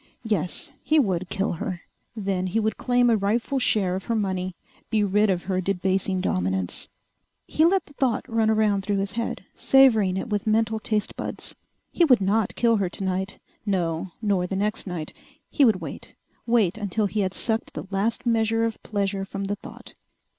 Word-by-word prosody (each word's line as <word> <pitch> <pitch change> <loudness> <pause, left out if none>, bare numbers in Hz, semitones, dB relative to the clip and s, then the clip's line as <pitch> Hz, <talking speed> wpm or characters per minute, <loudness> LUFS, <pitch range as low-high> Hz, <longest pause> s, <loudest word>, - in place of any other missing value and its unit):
Yes, 210 - 0
he 310 - +2
would 185 - +1
kill 195 -1 0
her. 180 0 -4 0.3
Then 195 -3 -1
he 200 +5 0
would 220 0 0
claim 245 -1 +2
a - - +5
rightful 225 +7 0
share 200 -7 +2
of 190 - -5
her 230 - 0
money, 185 -3 -1 0.3
be 215 -2 +2
rid 205 +1 +3
of 180 -2 0
her 185 0 -1
debasing 190 0 0
dominance. 95 - -1 0.6
He 315 - +2
let 370 +1 +3
the 290 - -18
thought 260 -5 0
run 225 -1 +1
around 215 -2 +2
through 200 +1 -1
his 195 0 -1
head, 230 0 -3
savoring 225 -9 +4
it - - -3
with 210 0 -2
mental 220 0 +2
taste 215 -1 -1
buds. - - -4 0.4
He 345 - +3
would 260 -7 +6
not 200 +2 +1
kill 230 -2 +3
her 195 -3 0
tonight. 190 +1 -3 0.3
No, 175 -3 -1
nor 195 -4 +1
the 195 - -3
next 210 +1 -1
night. 170 -4 -5 0.4
He 290 - +3
would 215 -8 +4
wait, 155 -4 -8 0.3
wait 225 -4 +2
until 210 +1 0
he 210 +2 -2
had 190 -2 0
sucked 225 -1 -1
the - - -5
last 225 +5 -1
measure 225 -1 +2
of 225 -1 -4
pleasure 200 -2 -2
from 195 0 -5
the 200 +1 -1
thought. - - -12
205 Hz, 185 wpm, -25 LUFS, 190-225 Hz, 0.6 s, would